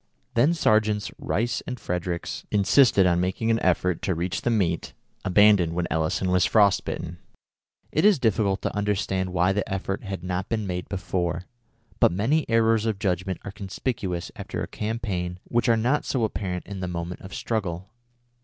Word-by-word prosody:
Then 140 +9 +3
Sergeants 110 - +2
Rice 115 +4 -1
and 125 -2 -4
Fredericks 90 -2 -3
insisted 105 0 +4
on 90 -1 +3
making 95 +5 0
an 115 - +2
effort 90 -2 +1
to 95 - 0
reach 85 +2 -2
the - - 0
meat 95 -8 0 0.3
abandoned 95 -3 +5
when 90 0 0
Elison 80 +3 0
was 90 0 +4
frost 100 -3 +4
bitten. 85 +1 -5 0.7
It 155 - +1
is 205 -3 +6
difficult 110 -5 +1
to - - -2
understand 95 -2 -1
why 90 +1 +2
the 105 0 -2
effort 95 0 -3
had 95 -4 -5
not 90 0 -3
been 110 -2 -1
made 90 -1 -4
before; 90 -2 -2 0.5
but - - +5
many 130 - +1
errors 115 -1 +3
of 110 -3 0
judgment 95 -2 -1
are 100 - -5
conspicuous 95 -2 -4
after - - -5
a - - -4
campaign 100 -5 -3
which 120 +1 0
are 115 - +5
not 125 +6 +1
so 130 -4 -1
apparent 95 -4 -3
in 100 -1 -7
the 90 - -3
moment 85 0 -5
of 95 - -10
struggle. 95 -4 -3
95 Hz, 170 wpm, -25 LUFS, 90-110 Hz, 0.7 s, is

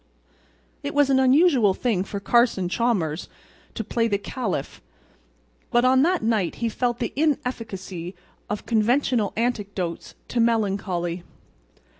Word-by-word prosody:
It 285 -1 -5
was 290 -1 +4
an 265 - +4
unusual 260 - +4
thing 220 -7 0
for 200 +1 -5
Carson 225 -3 +2
Chalmers 185 -7 -1 0.5
to 225 - -3
play 230 +2 0
the 205 -3 +1
Caliph. 200 - -4 0.9
But 240 +1 +3
on 260 +1 +5
that 350 +1 +2
night 220 -6 +1
he 230 - -1
felt 240 +1 -1
the 235 -2 -3
inefficacy 220 - -2 0.3
of 210 - -4
conventional 235 -1 +2
antidotes 200 -7 -3
to 240 - -1
melancholy. 195 -6 0
230 Hz, 125 wpm, -24 LUFS, 195-250 Hz, 0.9 s, on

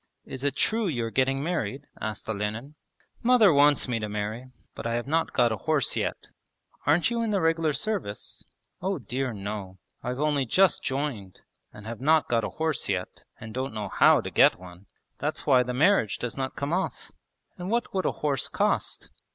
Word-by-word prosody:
'Is 130 0 -7
it 140 -1 0
true 220 +4 +1
you 120 -9 -1
are 115 - -4
getting 135 +2 +1
married?' 145 - -2 0.2
asked 110 -1 -4
Olenin. 110 +6 -3 0.5
'Mother 230 -7 +6
wants 145 0 +5
me 120 -2 -1
to 105 -1 -4
marry. 105 +4 -4 0.3
But - - -5
I 115 - -1
have 120 - -2
not 160 +4 0
got 120 -2 +3
a 110 - -1
horse 155 +2 0
yet.' - - -3 0.6
'Aren't 160 +9 +3
you 235 0 0
in 225 - 0
the 205 -2 +1
regular 165 -2 +2
service?' 150 - -4 0.4
'Oh 190 +1 -1
dear 130 +1 -3
no! 100 -2 -6 0.2
I've 125 +2 -4
only 145 -3 +1
just 190 +9 +4
joined, 130 -9 -3 0.3
and 105 - -12
have 115 +1 -6
not 155 +2 +4
got 115 -2 +1
a - - -2
horse 160 -7 -1
yet, 90 -2 -3
and 110 0 -9
don't 130 -2 -3
know 105 -2 -3
how - - +5
to - - -6
get - - +5
one. 90 +1 -13 0.3
That's - - -3
why 130 -1 +5
the 125 0 -2
marriage 150 - +3
does 120 - -4
not 130 -1 -3
come 140 +3 -2
off.' 190 +2 -2 0.5
'And 180 +1 -4
what 235 +2 -1
would 190 -1 0
a - - +2
horse 145 -3 -1
cost?' - - -1
135 Hz, 195 wpm, -27 LUFS, 110-160 Hz, 0.6 s, Mother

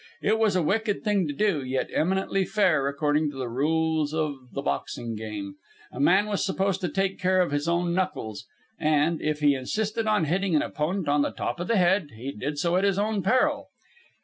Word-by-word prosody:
It 220 +2 +2
was 215 -4 +2
a 180 - +2
wicked 210 +4 0
thing 205 -6 +1
to 145 - -3
do, 195 -8 +1
yet 130 0 -2
eminently 190 +3 +1
fair 180 -9 +2
according 145 +2 +1
to 140 - -9
the 130 -2 -3
rules 155 +4 0
of 145 -5 -3
the 140 - -4
boxing 115 -4 -3
game. 105 -2 -6 0.3
A - - -9
man 190 +8 +4
was 210 -2 -1
supposed 195 0 0
to 180 - -1
take 195 +3 -1
care 185 0 +2
of 180 -5 +2
his 145 +2 -1
own 170 0 +1
knuckles, 115 - -3 0.3
and, 155 +1 +2
if 155 0 -1
he 145 -1 +5
insisted 215 - -2
on 210 -6 +2
hitting 180 +2 0
an 150 - +3
opponent 165 +4 -2
on 145 0 +3
the - - +1
top - - -4
of 175 - -3
the 230 - +2
head, 180 -3 +3
he 125 +5 -5
did 140 +5 -4
so 170 +4 +1
at 190 - +1
his 200 -1 +2
own 210 0 0
peril. 255 +8 +1
165 Hz, 210 wpm, -26 LUFS, 145-195 Hz, 0.3 s, he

